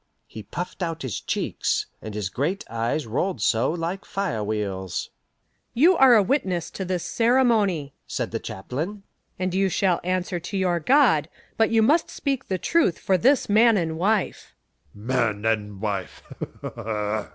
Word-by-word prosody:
He 110 - -9
puffed 175 - -6
out 165 -3 -3
his 120 -7 -4
cheeks, - - -1 0.2
and 110 -1 -7
his 105 -3 -2
great 165 +9 -2
eyes 115 +6 -1
rolled 175 - -1
so 115 +3 +2
like 175 +4 -3
fire 190 - -2
wheels. 100 -3 -3 0.6
"You 335 +10 +6
are 265 -4 +7
a 210 - +5
witness 185 - -1
to 190 - -5
this 180 -2 -2
ceremony," 225 - +2
said 125 -4 -3
the 115 - -2
chaplain. 140 - -5 0.3
"And 185 0 -2
you 195 +1 +2
shall 185 -1 +1
answer 185 0 -1
to 185 +4 -5
your 180 -2 +1
God, 190 - +4 0.3
but 225 - +3
you 225 -1 +3
must 300 +9 +3
speak 275 -2 -3
the 190 - -1
truth 315 - +2
for 190 - +1
this 255 +8 +3
man 220 +2 +5
and 165 -3 -1
wife." 195 +4 -1 0.4
"Man 110 -2 -1
and 105 -3 -1
wife?" 100 -3 -4
175 Hz, 155 wpm, -24 LUFS, -, 0.6 s, are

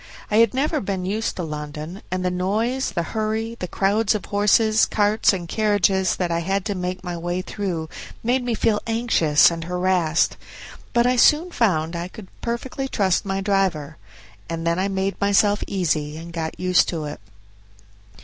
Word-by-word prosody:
I 210 - +3
had 230 0 +4
never 300 +3 0
been 190 -2 -3
used 215 +4 -2
to 180 - -4
London, 155 +4 -6
and 185 0 -2
the 180 - +1
noise, 220 +9 0
the 170 - -2
hurry, 220 +3 -2
the 180 - -3
crowds 200 +4 +1
of 210 - -4
horses, 215 +2 +3
carts, 210 +1 +3
and 180 -4 -4
carriages 195 -3 +2
that 175 -2 -2
I 170 - +1
had 195 +3 -1
to 210 - -1
make 185 0 -4
my 175 -1 -4
way 175 +2 -3
through 180 -6 -3 0.4
made 250 +2 +1
me 240 -2 -1
feel 215 -1 +1
anxious 225 -11 +4
and 165 0 -5
harassed; 180 -2 +1 0.5
but 235 0 +3
I 250 0 +2
soon 310 +8 +4
found 165 - +1
that 170 - -3
I 175 - -4
could 190 +1 -12
perfectly 250 +3 -3
trust 195 -8 +1
my 195 0 -2
driver, 190 -7 0 0.5
and 165 0 -4
then 170 +1 +1
I 190 - +1
made 195 0 -2
myself 205 +1 +3
easy 155 -5 -1
and 170 +1 -9
got 160 -1 -4
used 185 0 +3
to 160 -3 -3
it. 150 - -6
190 Hz, 180 wpm, -22 LUFS, 170-215 Hz, 0.5 s, had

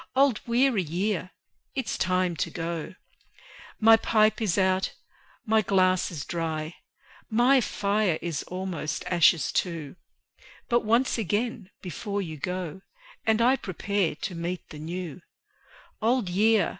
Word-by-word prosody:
Old 270 -4 +3
weary 240 -2 +3
year! 185 +3 -2 0.5
it's 265 -4 -2
time 185 -1 +1
to - - -1
go. 170 +1 -4 0.8
My 225 0 +7
pipe 215 0 +2
is 205 -5 +1
out, 190 0 +1 0.5
my 220 0 +3
glass 185 -2 +2
is 150 -6 -6
dry; 160 -1 -3 0.6
My 245 +4 +4
fire 200 -5 0
is 165 -4 -3
almost 180 -4 -4
ashes 170 -3 +4
too; 165 -5 -2 0.7
But 240 -1 +3
once 235 +3 +2
again, 215 0 -2
before 200 +4 -4
you 160 -5 -5
go, 180 +2 -4 0.5
And 220 +1 +3
I 255 +3 +5
prepare 195 - -1
to 180 - -5
meet 175 +1 -4
the 150 - -9
New: 170 +1 -5 0.8
Old 230 -3 +2
Year! 215 +4 +3
190 Hz, 130 wpm, -27 LUFS, 170-220 Hz, 0.8 s, My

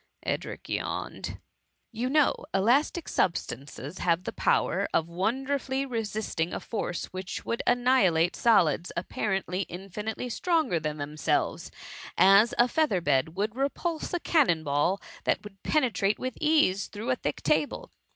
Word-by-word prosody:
^ - - -40 0.2
(Edric - - -3
yawne^.) - - -4 0.5
You 240 +2 -2
know, 300 +1 +4 0.2
elastic 265 - +2
substances 145 -1 -2
have 175 0 +1
the - - -5
power - - +1
of 165 - +2
won 195 +10 -1
derfully 270 0 -1
resisting 215 -8 -2
a - - -3
force 200 -6 -3
which 185 +1 -5
would 230 - -1
annihilate 225 -10 +3
solids, 180 -8 +3
apparently 190 0 -2
infinitely 200 +6 -5
stronger 315 - +1
than 155 -1 -3
them 150 +1 -6
selves, - - 0 0.5
as 200 +4 +6
a 240 - +5
feather 275 - +1
bed 145 0 +1
will 205 +3 0
repulse 285 +5 -2
a 350 - 0
cannon 260 - +2
ball 150 +7 +1 0.3
that - - +1
would 200 -2 -12
penetrate 230 -9 +1
with 255 0 -4
ease 300 -12 +3
through 220 +5 -4
a - - +3
thick 150 -11 -4
table. 155 -1 0
200 Hz, 145 wpm, -28 LUFS, 170-255 Hz, 0.5 s, as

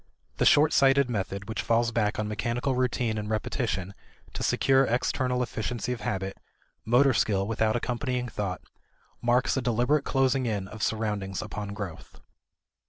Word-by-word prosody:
The - - +3
short 150 +1 +5
sighted 135 -1 +4
method 100 -2 -3
which 110 0 -3
falls 115 0 +1
back 105 -2 0
on 105 - -1
mechanical 115 +5 -1
routine 125 -3 0
and 105 0 -5
repetition 110 -3 -2 0.4
to - - -5
secure 135 0 +3
external 125 0 0
efficiency 120 +1 -3
of 120 - -7
habit, 95 -2 -3 0.5
motor 130 +4 +4
skill 100 -4 +1
without 110 +1 0
accompanying 125 +1 -2
thought, 100 -5 -4 0.6
marks 120 +2 +2
a - - +1
deliberate 125 +4 +1
closing 135 -1 +1
in 100 -4 -2
of 110 +3 -9
surroundings 105 -4 -1
upon 105 -1 -6
growth. 95 -5 -8
115 Hz, 150 wpm, -27 LUFS, 105-125 Hz, 0.6 s, short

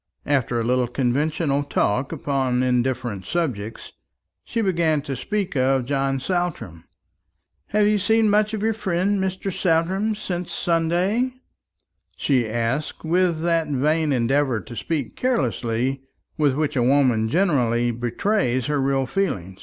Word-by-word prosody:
After 130 -4 +1
a - - 0
little 125 +1 +1
conventional 140 +4 0
talk 130 -2 0
upon 135 -5 0
indifferent 125 -5 0
subjects, 115 - -3 0.5
she 230 - -2
began 165 -7 +1
to 140 -2 -4
speak 200 - -3
of 130 -1 +2
John 135 0 0
Saltram. 160 - -3 0.8
"Have 210 0 +2
you 210 0 +3
seen 220 +2 +3
much 210 +1 +2
of 210 - -4
your 225 0 +2
friend 195 -1 0
Mr. 190 0 -3
Saltram 190 +5 +1
since 180 -4 -4
Sunday?" 180 +9 0 0.8
she 125 -6 +1
asked, 120 +6 -2
with 170 -1 +1
that 165 -2 +1
vain 150 +2 +1
endeavour 130 0 +1
to 120 - -10
speak 150 -1 -3
carelessly 130 - -1 0.3
with 145 -4 +2
which 150 -1 -1
a 125 - +2
woman 125 -4 +3
generally 120 - +2
betrays 125 - 0
her 145 -1 0
real 135 0 +1
feeling. 95 - -2
145 Hz, 135 wpm, -23 LUFS, 125-180 Hz, 0.8 s, you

